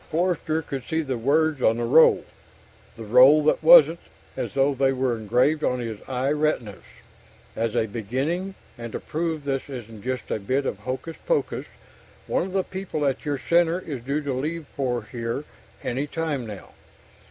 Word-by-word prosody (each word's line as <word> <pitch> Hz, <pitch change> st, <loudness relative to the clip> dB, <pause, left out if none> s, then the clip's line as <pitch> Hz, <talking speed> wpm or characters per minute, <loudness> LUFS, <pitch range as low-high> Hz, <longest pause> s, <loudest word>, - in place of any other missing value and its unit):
Forster 160 Hz, -1 st, 0 dB
could 135 Hz, -3 st, -5 dB
see 160 Hz, +4 st, -1 dB
the 130 Hz, -4 st, -3 dB
words 150 Hz, +3 st, +2 dB
on 115 Hz, -1 st, +3 dB
the 120 Hz, -, -2 dB
roll, 135 Hz, +7 st, +5 dB, 0.7 s
the 115 Hz, -, -8 dB
roll 130 Hz, +7 st, +7 dB
that 155 Hz, -, +2 dB
wasn't, -, -, +8 dB, 0.4 s
as -, -, -4 dB
though 135 Hz, +1 st, +3 dB
they 135 Hz, 0 st, +2 dB
were 130 Hz, -2 st, 0 dB
engraved 125 Hz, +8 st, +1 dB
on 125 Hz, -, +1 dB
his 115 Hz, -4 st, -5 dB
eye 130 Hz, +1 st, -1 dB
retinas: 150 Hz, -9 st, -1 dB, 0.7 s
_As 115 Hz, -1 st, -1 dB
a -, -, +2 dB
beginning, 135 Hz, -, -3 dB, 0.2 s
and 115 Hz, -1 st, -7 dB
to -, -, -3 dB
prove 160 Hz, -1 st, -3 dB
this 135 Hz, 0 st, -3 dB
isn't 115 Hz, -5 st, -8 dB
just 130 Hz, -1 st, -4 dB
a -, -, -1 dB
bit 130 Hz, +8 st, -1 dB
of 105 Hz, -, -3 dB
hocus 130 Hz, +8 st, -5 dB
pocus, -, -, 0 dB, 0.6 s
one -, -, 0 dB
of 185 Hz, -, -9 dB
the 190 Hz, -1 st, +1 dB
people 185 Hz, -6 st, -4 dB
at 135 Hz, +3 st, -1 dB
your 145 Hz, -1 st, -1 dB
Center 170 Hz, +4 st, +2 dB
is 145 Hz, -9 st, -6 dB
due 140 Hz, +4 st, -2 dB
to 140 Hz, -2 st, -2 dB
leave 155 Hz, +5 st, -3 dB
for 125 Hz, -4 st, -1 dB
here 115 Hz, +4 st, -4 dB, 0.4 s
any 135 Hz, +4 st, -2 dB
time 145 Hz, -6 st, -3 dB
now. 105 Hz, -3 st, -9 dB
135 Hz, 175 wpm, -24 LUFS, 120-155 Hz, 0.7 s, wasn't